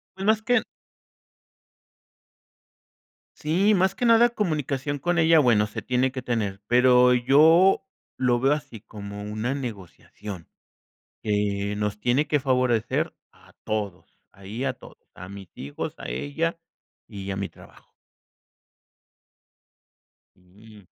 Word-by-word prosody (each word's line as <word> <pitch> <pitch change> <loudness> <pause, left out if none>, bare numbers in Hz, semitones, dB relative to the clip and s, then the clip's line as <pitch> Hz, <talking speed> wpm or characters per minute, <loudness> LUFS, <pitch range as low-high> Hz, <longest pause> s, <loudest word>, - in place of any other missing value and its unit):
Bueno, 195 +3 +2
es 220 0 -1
que 245 -1 +2 2.7
Sí, 185 +8 +2
más 190 0 +2
que 250 - -2
nada 230 +1 +6
comunicación 145 - -2
con 175 +5 0
ella, 160 0 +5
bueno 115 -7 +4
se 105 - -6
tiene 125 +1 0
que 130 0 -5
tener, 105 -6 -2
pero 125 +1 +5
yo 160 +9 +5 0.3
lo 125 -2 +2
veo 135 +3 +3
así 140 -6 -6
como 100 -1 -9
una 110 +5 -3
negociación, 100 - -8 0.7
que 105 -1 -1
nos 105 0 -3
tiene 125 +7 +1
que 150 0 +1
favorecer 125 -4 0 0.2
a - - -22
todos, 105 -4 -5
ahí 100 +6 -7
a 135 -2 0
todos, - - -15 0.2
a 90 - -9
mis 100 -1 -10
hijos, 70 +2 -6
a - - -8
ella 160 - -2 0.5
y 100 -3 -7
a - - -3
mi 100 0 -3
trabajo. - - -19 2.4
Mm. 100 +4 -18
125 Hz, 125 wpm, -25 LUFS, 105-150 Hz, 2.7 s, nada